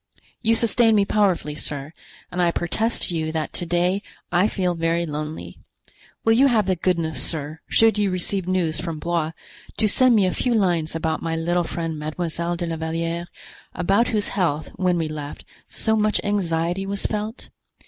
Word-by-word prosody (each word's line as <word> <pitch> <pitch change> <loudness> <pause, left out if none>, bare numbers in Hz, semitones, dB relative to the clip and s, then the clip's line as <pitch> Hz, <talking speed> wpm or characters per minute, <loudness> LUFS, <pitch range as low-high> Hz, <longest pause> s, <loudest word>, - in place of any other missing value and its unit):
You 225 -1 +3
sustained 230 0 +4
me 200 -1 +4
powerfully, 190 -8 +1
sir, 145 0 -5 0.4
and 180 - -1
I 175 - +4
protest 215 +7 +1
to 175 - -1
you 160 -1 -1
that 160 -1 -2
to 175 - -2
day 180 +3 +1 0.3
I 180 +4 +4
feel 185 -4 0
very 165 0 0
lonely. 150 0 -6 0.7
Will 225 - +5
you 265 +5 +5
have 225 -6 +3
the 190 -1 +1
goodness, 165 -5 0
sir, 155 0 -4
should 225 -2 +4
you 205 -1 +2
receive 185 0 -2
news 175 -4 0
from 165 -3 -4
Blois, 165 0 -1 0.4
to 215 - +3
send 255 +3 +5
me 205 -3 +4
a 185 - +1
few 245 -2 0
lines 175 -7 +1
about 160 -1 -1
my 165 -1 -2
little 175 +2 0
friend 165 -2 -4
Mademoiselle 170 +2 -2
de 175 0 -3
la 165 -1 -3
Valliere, 165 +2 -2 0.5
about 195 +6 +2
whose 210 -2 0
health, 160 -6 0
when 180 -2 +1
we 165 -2 0
left, 150 -1 -7 0.2
so 220 -1 0
much 215 -1 +2
anxiety 180 -2 0
was 200 0 -3
felt? 215 +2 -3
175 Hz, 180 wpm, -23 LUFS, 160-205 Hz, 0.7 s, Will